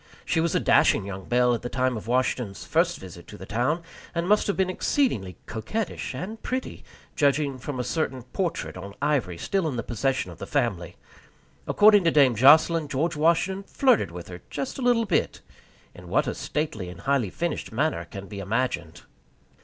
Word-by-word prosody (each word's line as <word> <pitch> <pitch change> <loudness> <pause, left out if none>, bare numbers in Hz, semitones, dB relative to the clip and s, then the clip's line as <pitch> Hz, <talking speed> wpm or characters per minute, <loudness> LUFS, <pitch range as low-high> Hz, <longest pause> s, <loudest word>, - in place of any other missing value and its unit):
She - - +1
was 165 0 0
a - - +4
dashing - - +4
young 95 -1 -7
belle 125 0 +3
at 120 - -2
the 120 - -5
time 130 -1 0
of 110 0 -7
Washington's 125 -4 -1
first 170 +1 +1
visit 90 -2 -11
to 105 - -10
the 95 - -9
town, 125 - 0 0.3
and 170 +1 -1
must 210 +2 +3
have 200 - -1
been 190 -1 +2
exceedingly 180 - 0
coquettish 185 - -4
and 220 +5 -6
pretty, 255 +1 -4 0.3
judging 140 -2 +1
from 130 +1 -5
a - - 0
certain 130 -2 -2
portrait 170 +7 -3
on 100 0 -8
ivory 135 - 0
still 190 - -1
in 140 - -2
the 115 - -2
possession 130 +4 -1
of - - -13
the - - -6
family. 115 - -1 0.7
According 205 -1 +6
to - - +6
Dame 140 -5 +5
Jocelyn, 155 +6 +5
George 150 +5 -1
Washington 170 +5 +2
flirted 255 - +3
with 85 0 -9
her 90 -1 -9
just 270 +1 -4
a - - -4
little 240 -2 +3
bit 185 -6 0 0.5
in - - -13
what - - +2
a - - -2
stately 110 - -3
and 90 - -10
highly 135 -7 +1
finished 170 - -3
manner 130 - 0
can 100 +3 -9
be 100 0 -7
imagined. 95 -6 -2
135 Hz, 190 wpm, -25 LUFS, 110-170 Hz, 0.7 s, According